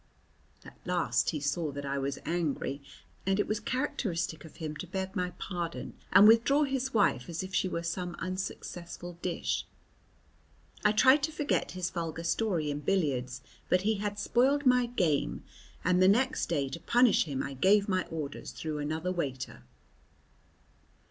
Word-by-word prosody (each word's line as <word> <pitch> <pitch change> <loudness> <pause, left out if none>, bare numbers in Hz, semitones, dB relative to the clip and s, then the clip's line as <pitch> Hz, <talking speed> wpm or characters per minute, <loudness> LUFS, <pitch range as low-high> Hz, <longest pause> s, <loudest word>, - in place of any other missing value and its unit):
At - - -13
last 180 -1 +1
he 155 - -2
saw 150 +2 -1
that 140 0 -5
I 140 0 -1
was 140 0 -2
angry, 150 -4 -1 0.5
and 195 +1 +2
it - - +2
was 215 0 -1
characteristic 205 - -2
of 160 - -13
him 155 -2 -5
to 185 - -6
beg 190 +2 -4
my 180 -2 0
pardon 175 -3 -4 0.2
and 205 - +9
withdraw 230 +7 +5
his 265 -2 -1
wife 205 - +2
as 170 +1 -3
if 190 0 -8
she 185 - +2
were 170 -2 -3
some 175 +1 -3
unsuccessful 175 -1 -6
dish. 180 -2 -2 1.2
I 210 - +5
tried 260 +7 +6
to 305 +3 -1
forget 300 -2 -1
his 185 0 -3
vulgar 165 -1 -4
story 170 -4 0
in 145 - -3
billiards, 140 -7 0 0.3
but 180 - +4
he 215 +2 +1
had 205 0 -3
spoiled 265 +7 +2
my 250 -1 +5
game, 155 - 0 0.4
and 180 +1 +3
next 235 - +3
day 145 -5 0
to 135 - -6
punish 240 +6 +4
him 140 -4 -3
I 140 - -5
gave 200 - +4
my 185 -2 +1
orders 150 -3 -5
through 155 -2 -4
another 155 +4 -2
waiter. 135 -7 -4
180 Hz, 160 wpm, -30 LUFS, 155-210 Hz, 1.2 s, and